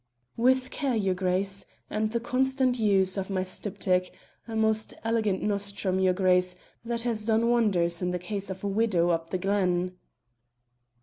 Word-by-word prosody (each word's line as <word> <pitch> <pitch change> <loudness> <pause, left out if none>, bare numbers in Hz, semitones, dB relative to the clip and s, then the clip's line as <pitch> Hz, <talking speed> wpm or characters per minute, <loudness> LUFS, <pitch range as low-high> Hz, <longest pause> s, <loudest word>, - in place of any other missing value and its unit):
"With 255 +2 +2
care, 275 -5 -1
your 195 -4 +1
Grace; 190 +2 -1 0.2
and 215 0 -1
the 235 - 0
constant 255 +1 +1
use 195 -3 +2
of 195 0 -3
my 190 -1 0
styptic, 185 -1 -1 0.4
a 225 - -5
most 220 0 +1
elegant 220 -4 0
nostrum, 200 -2 -1
your 190 -1 +4
Grace, 180 -1 +2 0.3
that 235 0 -2
has 230 -3 -1
done 225 +1 +2
wonders 185 -8 +2
in 180 - 0
the 180 - -1
case 195 +2 -5
of 190 0 -6
a - - -1
widow 195 -4 +2
up 165 0 -1
the 185 - -1
glen." 185 -2 0
200 Hz, 165 wpm, -27 LUFS, 185-225 Hz, 0.4 s, your